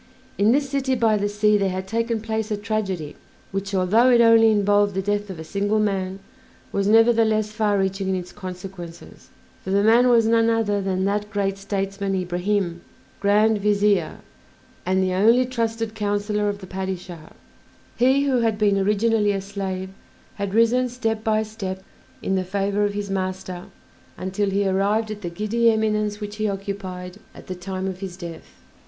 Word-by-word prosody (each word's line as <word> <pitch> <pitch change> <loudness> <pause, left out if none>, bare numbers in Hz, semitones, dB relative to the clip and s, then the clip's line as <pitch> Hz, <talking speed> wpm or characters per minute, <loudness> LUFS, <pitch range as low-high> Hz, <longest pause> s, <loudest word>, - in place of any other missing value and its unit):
In 205 +3 +4
this 280 +2 +2
city 270 -1 0
by 225 -3 +3
the 205 0 0
sea 210 0 +2
there 195 -1 +1
had 185 0 -4
taken 230 +1 -1
place 220 0 -3
a 210 - -1
tragedy 200 -7 -3 0.4
which, 195 +1 -3
although 210 +7 +4
it 240 -1 +5
only 230 -1 +6
involved 205 -1 +2
the 190 - 0
death 205 +1 -1
of 185 - -6
a 160 - -7
single 205 +5 -1
man, 195 -3 -1 0.5
was 200 0 0
nevertheless 220 -1 +4
far 215 -2 +1
reaching 195 0 -1
in 190 - +1
its 180 -1 -5
consequences; 180 -3 -9 0.3
for - - -6
the 200 +1 +2
man 235 +3 +5
was 230 -2 +5
none 230 0 +3
other 215 -3 +1
than 190 -1 -1
that 205 +1 -1
great 200 -2 -1
statesman 195 0 -2
Ibrahim, 180 0 -1 0.4
Grand 210 +2 +3
Vizier, 200 -4 +1 0.7
and 190 0 +2
the 185 -1 0
only 230 +7 +4
trusted 225 -3 -2
counsellor 210 0 -1
of 200 0 -5
the - - -8
Padishah. 185 -3 -6 0.6
He 260 +3 +3
who 270 -3 +2
had 225 -2 +1
been 205 -2 +2
originally 210 +1 +2
a 195 - -1
slave 190 -1 -5 0.4
had 200 0 -4
risen 245 +3 +3
step 225 -3 -2
by 220 -1 +1
step 195 -4 -6 0.4
in 195 - -1
the 190 -1 +1
favor 200 +2 -1
of 205 0 -2
his 205 -1 -4
master 185 -1 -4 0.5
until 190 +2 -1
he 200 0 +1
arrived 205 +3 +1
at 210 -1 -7
the 175 - -4
giddy 215 +6 +1
eminence 215 -1 0
which 210 0 -6
he 215 -1 0
occupied 195 -2 -6 0.2
at - - -12
the 185 - -5
time 185 +1 -5
of 185 -1 -5
his 190 -2 -7
death. 160 - -10
205 Hz, 175 wpm, -23 LUFS, 190-220 Hz, 0.7 s, only